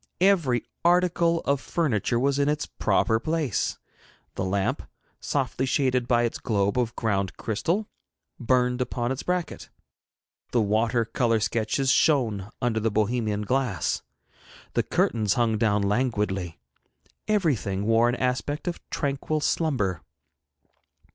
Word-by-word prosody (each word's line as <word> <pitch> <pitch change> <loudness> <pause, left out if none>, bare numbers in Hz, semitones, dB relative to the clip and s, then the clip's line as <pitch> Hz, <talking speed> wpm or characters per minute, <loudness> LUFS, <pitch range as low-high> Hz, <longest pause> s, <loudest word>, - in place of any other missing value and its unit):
Every 170 - +3 0.2
article 170 -1 +3
of 140 -1 0
furniture 120 - 0
was 140 +2 +1
in 140 0 +2
its 150 0 -1
proper 115 -1 +1
place. 155 -4 -1 0.6
The 95 - -3
lamp, 95 +1 0 0.4
softly 130 - -1
shaded 130 -2 +1
by 120 -1 +3
its 120 - -2
globe 100 0 0
of 120 -2 -1
ground 100 -4 -1
crystal, 170 - -1 0.5
burned 125 +1 +1
upon 120 -1 -2
its 135 - -3
bracket; 180 -2 -3 0.8
the 120 - +3
water 115 +2 +1
colour 115 0 +1
sketches 115 +5 0
shone 115 -12 +2
under 115 -2 +1
their 115 +1 +1
Bohemian 110 0 0
glass; 120 - 0 0.7
the - - +2
curtains 105 -3 +1
hung 115 -3 +1
down 105 -2 +2
languidly; 105 -5 -1 0.7
everything 130 - 0
wore 115 +2 +4
an 120 - 0
aspect 130 +5 -2
of 175 - -2
tranquil 140 +2 -1
slumber. 125 - 0
120 Hz, 125 wpm, -26 LUFS, 105-140 Hz, 0.8 s, wore